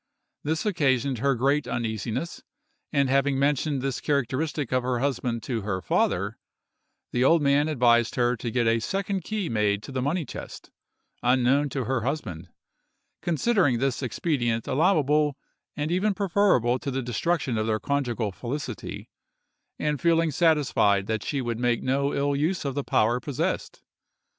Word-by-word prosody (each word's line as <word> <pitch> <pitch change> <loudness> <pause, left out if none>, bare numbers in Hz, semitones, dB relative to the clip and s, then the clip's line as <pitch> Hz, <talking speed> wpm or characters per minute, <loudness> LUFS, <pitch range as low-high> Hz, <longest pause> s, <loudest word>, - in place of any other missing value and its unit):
This 160 +4 -1
occasioned 140 - +1
her 140 +2 +2
great 140 +4 +1
uneasiness, 115 - -3 0.5
and 140 -3 +2
having 135 +1 +2
mentioned 140 0 +1
this 135 -2 -2
characteristic 140 0 -1
of 130 - +3
her 125 0 -1
husband 120 -3 -1
to 120 -4 -2
her 95 -2 -2
father, - - 0 0.7
the 125 - +1
old 160 +3 +4
man 140 +2 +3
advised 120 -5 +3
her 120 0 +2
to 115 - -4
get 120 +1 0
a 115 0 +3
second 195 - -2
key 215 -2 -2
made 105 -3 0
to - - -8
the 130 -1 -2
money 155 +5 -1
chest, - - -9 0.5
unknown 130 +3 +3
to 135 -1 -2
her 130 +1 -1
husband, 95 - -4 0.7
considering 175 - +2
this 135 0 -1
expedient 120 -3 -1
allowable 150 -2 +2 0.4
and 150 +2 -2
even 195 +3 +1
preferable 185 - +2
to - - -4
the 135 0 -2
destruction 130 +3 -1
of 110 - -1
their 110 -1 +1
conjugal 125 -7 -1
felicity, 125 +3 -6 0.7
and 150 -2 -1
feeling 165 -1 +3
satisfied 140 - +3
that 110 0 -2
she 140 -3 -2
would 120 -2 -3
make 120 -1 +1
no 140 +2 +1
ill 140 0 0
use 155 +4 0
of 140 - -1
the 140 +1 -2
power 120 +1 +2
possessed. 140 0 -3
135 Hz, 155 wpm, -26 LUFS, 120-150 Hz, 0.7 s, old